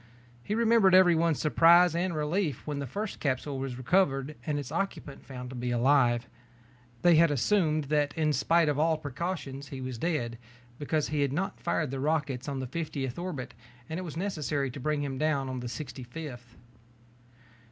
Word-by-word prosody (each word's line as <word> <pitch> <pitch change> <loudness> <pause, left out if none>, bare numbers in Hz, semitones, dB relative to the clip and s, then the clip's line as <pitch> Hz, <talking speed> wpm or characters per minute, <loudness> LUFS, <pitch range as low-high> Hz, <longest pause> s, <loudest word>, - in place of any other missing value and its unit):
He 210 - -2
remembered 225 -4 +5
everyone's 170 -4 +5
surprise 170 +2 +5
and 175 0 -1
relief 155 - -1
when 145 -2 -3
the 140 - -4
first 205 - -4
capsule 135 0 -2
was 135 -2 -4
recovered 140 -1 +1
and 150 -1 0
its 140 -4 -5
occupant 195 -7 -4
found 125 -1 -8
to - - -7
be 125 0 -3
alive. 120 -1 +3 0.8
They 175 - +6
had 165 0 +6
assumed 155 - +2
that 145 0 +1
in 155 -1 +2
spite 165 +4 +3
of 145 -1 0
all 160 0 +3
precautions 145 -1 -5
he 135 - -7
was 130 -3 -5
dead 120 -8 -2 0.4
because 150 +1 -1
he 150 -1 0
had 140 -2 +1
not 195 +6 -2
fired 155 -5 -1
the 135 - -3
rockets 145 -3 -1
on 140 -1 -3
the 130 - -3
fiftieth 140 -2 -4
orbit 145 -9 -5 0.3
and 160 +2 -4
it - - -4
was 165 -3 -7
necessary 150 -7 -2
to 140 - -8
bring 150 +2 -1
him 135 -2 -4
down 145 -3 +1
on 130 -1 -4
the 120 0 -5
sixty 130 +2 -7
fifth. 125 -2 -9
145 Hz, 185 wpm, -29 LUFS, 130-165 Hz, 0.8 s, They